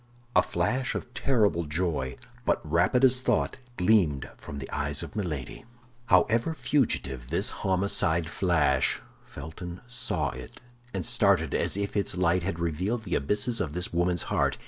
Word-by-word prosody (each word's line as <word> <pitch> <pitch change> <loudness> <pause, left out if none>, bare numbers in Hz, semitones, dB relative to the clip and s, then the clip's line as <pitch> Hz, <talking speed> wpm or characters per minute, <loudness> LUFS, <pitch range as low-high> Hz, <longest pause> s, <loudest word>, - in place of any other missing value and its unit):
A - - +7
flash 130 0 -1
of 120 - -5
terrible 105 - +2
joy, 75 -5 -2 0.3
but - - +2
rapid 90 - +3
as 130 0 +3
thought, - - 0 0.2
gleamed 90 -8 +3
from 70 - -9
the 65 -1 -6
eyes 75 0 -1
of - - -9
Milady. 80 - -4 0.4
However 115 - +3
fugitive 70 - 0
this 85 +6 0
homicide 95 -4 +2
flash, 80 -6 +2 0.3
Felton 85 +4 -8
saw 125 -1 -1
it, 65 0 -10 0.3
and - - -3
started 100 - +3
as - - +1
if 100 0 -3
its 100 -3 0
light 90 0 +2
had 85 0 -3
revealed 90 +8 -2
the 90 - -5
abysses 105 - +1
of 80 -5 -3
this 90 0 -1
woman's 90 0 +1
heart. - - 0
90 Hz, 150 wpm, -27 LUFS, 80-105 Hz, 0.4 s, A